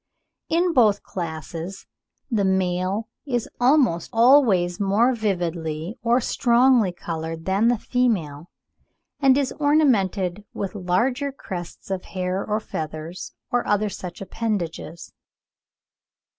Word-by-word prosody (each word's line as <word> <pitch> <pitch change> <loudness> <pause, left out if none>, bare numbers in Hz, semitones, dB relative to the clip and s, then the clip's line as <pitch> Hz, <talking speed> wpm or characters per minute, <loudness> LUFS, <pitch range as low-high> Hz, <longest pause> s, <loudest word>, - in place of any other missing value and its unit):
In 345 +1 +2
both 215 -7 +4
classes 170 +2 -6 0.5
the 215 -4 +2
male 190 +2 0 0.2
is 245 -4 -1
almost 245 - +3
always 225 -8 +4
more 210 +6 +3
vividly 175 -4 -2
or 235 +2 +3
strongly 240 -3 +3
coloured 165 -1 -5
than 195 +4 +2
the 240 0 +3
female, 180 - -1 0.7
and 270 -1 +5
is 275 -2 0
ornamented 210 - +2
with 195 - -3
larger 235 +9 0
crests 185 -8 -8
of 190 -1 -3
hair 185 +1 -2
or 210 0 -1
feathers, 160 -2 -6 0.2
or 245 0 0
other 210 0 +1
such 180 -2 -8
appendages. 185 -6 -4
200 Hz, 110 wpm, -23 LUFS, 175-240 Hz, 0.7 s, and